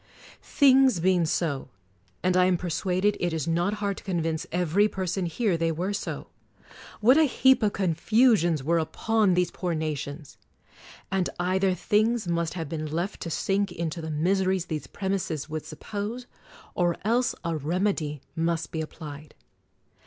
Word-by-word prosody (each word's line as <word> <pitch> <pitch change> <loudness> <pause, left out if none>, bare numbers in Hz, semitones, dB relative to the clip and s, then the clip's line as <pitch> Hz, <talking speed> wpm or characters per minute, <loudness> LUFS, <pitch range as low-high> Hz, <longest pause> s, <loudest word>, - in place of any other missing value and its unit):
Things 265 -7 +4
being 180 0 +3
so, 150 -4 -1 0.3
— 95 -1 -38
and 185 0 +2
I 180 0 +5
am 185 -1 +3
persuaded 185 +4 0
it 175 -1 -1
is 160 -2 -2
not 175 +5 +1
hard 200 -2 -2
to - - -10
convince 165 -4 -2
every 180 +4 +2
person 185 -2 -2
here 185 +1 0
they 165 0 +1
were 180 +5 -2
so, 200 - -5 0.4
— - - -18
what 255 +8 +6
a 320 - +6
heap 265 0 +4
of 210 -2 +1
confusions 185 - +2
were 165 +4 +2
upon 210 +4 +1
these 180 0 +1
poor 175 -3 -2
nations! 150 -1 -5 0.7
And 190 -2 +1
either 185 +1 +1
things 215 +4 +1
must 170 -1 -1
have 165 -3 -4
been 155 0 -4
left 170 +6 -3
to 170 - -4
sink 195 +4 0
into 165 0 -4
the 160 - -5
miseries 185 +3 +1
these 155 -4 -4
premises 190 -7 -3
would 155 0 -5
suppose, 215 +4 -5 0.5
or 175 -1 +1
else 240 +3 +2
a 170 -1 -1
remedy 155 -2 -1
must 165 0 -1
be 160 - -2
applied. 150 -2 -9
175 Hz, 160 wpm, -26 LUFS, 160-200 Hz, 0.7 s, what